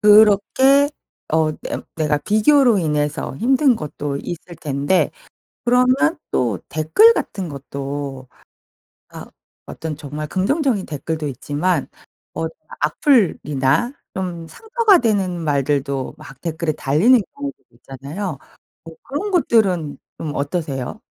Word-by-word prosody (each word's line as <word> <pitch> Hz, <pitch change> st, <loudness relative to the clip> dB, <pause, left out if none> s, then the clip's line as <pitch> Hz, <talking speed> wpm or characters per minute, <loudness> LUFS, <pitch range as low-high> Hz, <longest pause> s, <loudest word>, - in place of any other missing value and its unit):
그렇게 215 Hz, +7 st, +5 dB, 0.4 s
어 160 Hz, -1 st, +3 dB
냄 -, -, -4 dB
내가 150 Hz, -2 st, +1 dB
비교로 220 Hz, -, +4 dB
인해서 150 Hz, -4 st, -1 dB
힘든 260 Hz, -, +3 dB
것도 145 Hz, -3 st, -4 dB
있을 175 Hz, +2 st, -7 dB
텐데 145 Hz, +5 st, +1 dB, 0.6 s
그러면 255 Hz, +6 st, +3 dB
또 115 Hz, -7 st, 0 dB
댓글 375 Hz, -, +5 dB
같은 190 Hz, -, -4 dB
것도 140 Hz, -1 st, -6 dB, 0.8 s
아 -, -, -9 dB, 0.4 s
어떤 160 Hz, -1 st, -6 dB
정말 150 Hz, 0 st, -6 dB
긍정적인 220 Hz, -, 0 dB
댓글도 155 Hz, +1 st, -4 dB
있지만 145 Hz, +4 st, -1 dB, 0.5 s
어 165 Hz, -, -2 dB, 0.3 s
악플이나 155 Hz, -, +2 dB, 0.2 s
좀 175 Hz, -3 st, -4 dB
상처가 445 Hz, -, +3 dB
되는 195 Hz, -7 st, 0 dB
말들도 140 Hz, -1 st, -1 dB
막 145 Hz, -3 st, -13 dB
댓글에 165 Hz, -1 st, -2 dB
달리는 170 Hz, -, +4 dB, 0.2 s
경우도 285 Hz, 0 st, -5 dB
있잖아요. 140 Hz, -, -6 dB, 0.5 s
어 165 Hz, -, -9 dB
그런 305 Hz, +9 st, -4 dB
것들은 195 Hz, -, +2 dB, 0.2 s
좀 150 Hz, -2 st, -5 dB
어떠세요? 140 Hz, -, -3 dB
165 Hz, 240 characters per minute, -20 LUFS, 145-230 Hz, 0.8 s, 그렇게